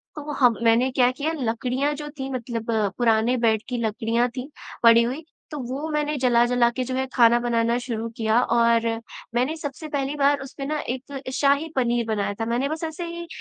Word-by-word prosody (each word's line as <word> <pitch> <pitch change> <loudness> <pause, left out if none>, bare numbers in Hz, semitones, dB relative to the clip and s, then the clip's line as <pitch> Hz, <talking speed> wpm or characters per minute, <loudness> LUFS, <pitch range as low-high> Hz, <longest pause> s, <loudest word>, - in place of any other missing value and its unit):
तो 300 0 -6
हम 250 -5 +3
मैंने 230 +3 +4
क्या 250 -1 +3
किया 285 +5 -2
लकड़ियाँ 255 +1 -1
जो 295 0 -7
थी 265 0 -3
मतलब 235 -2 -4 0.3
पुराने 230 +1 +2
बेड 225 -2 +2
की 250 - -2
लकड़ियाँ 230 +2 0
थी 255 +3 -5 0.3
पड़ी 230 0 +7
हुई, 260 +7 -3 0.3
तो 300 - -5
वो 265 +5 -4
मैंने 300 0 0
जला-जला 240 -1 +3
के 255 +2 -3
जो 255 +1 -4
है 265 0 0
खाना 235 -1 +5
बनाना 235 0 +1
शुरू 230 -2 -4
किया 220 0 +2
और 230 -1 +3 0.5
मैंने 255 +6 +1
सबसे 305 +1 -6
पहली 285 -1 -2
बार 285 0 +3
उस 270 - -9
पे 275 - -4
ना 300 +2 -2
एक 260 +1 -5
शाही 280 +3 +2
पनीर 240 -2 +1
बनाया 205 -2 -1
था 225 - -1
मैंने 240 +4 0
बस 315 +2 -4
ऐसे 325 +2 -4
ही 340 0 -7
250 Hz, 195 wpm, -24 LUFS, 235-280 Hz, 0.5 s, पड़ी